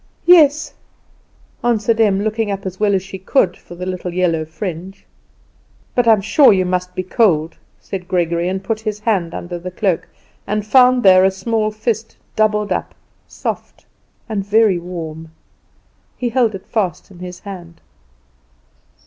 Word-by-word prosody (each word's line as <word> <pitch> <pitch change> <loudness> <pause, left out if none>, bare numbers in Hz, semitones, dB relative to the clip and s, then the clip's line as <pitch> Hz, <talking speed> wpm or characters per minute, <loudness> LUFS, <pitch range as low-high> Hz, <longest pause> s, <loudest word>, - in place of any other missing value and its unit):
"Yes," 310 -3 +5 0.9
answered 230 -1 +1
Em, 200 -3 +3
looking 220 0 -1
up 195 0 -4
as 185 0 -5
well 205 -1 +2
as 190 - -1
she 190 0 -9
could 190 -2 +1
for 175 - -13
the 180 +1 -6
little 185 -1 -4
yellow 170 -3 0
fringe. 180 +3 -7 0.9
"But 245 -1 +1
I'm 220 -3 +5
sure 270 +7 +5
you 185 -2 +2
must 180 0 -2
be 185 - -2
cold," 175 -6 +1 0.2
said 185 -2 -7
Gregory, 170 -1 0
and 190 +1 -3
put 220 0 -2
his 215 -1 -4
hand 195 -7 0
under 175 0 -6
the 180 +2 -6
cloak, 185 -1 -1 0.4
and 210 0 -1
found 250 +2 +5
there 185 -1 +7
a 190 - +5
small 215 +3 -1
fist 220 +1 -3 0.2
doubled 210 -1 +1
up, - - -2 0.3
soft, - - -6 0.4
and 210 -4 -2
very 205 -2 +3
warm. 165 -2 -7 0.9
He 245 - -1
held 235 -3 +1
it 190 - -9
fast 195 -5 -2
in 180 - -14
his 180 0 -8
hand. 175 -4 -10
195 Hz, 155 wpm, -18 LUFS, 180-220 Hz, 0.9 s, there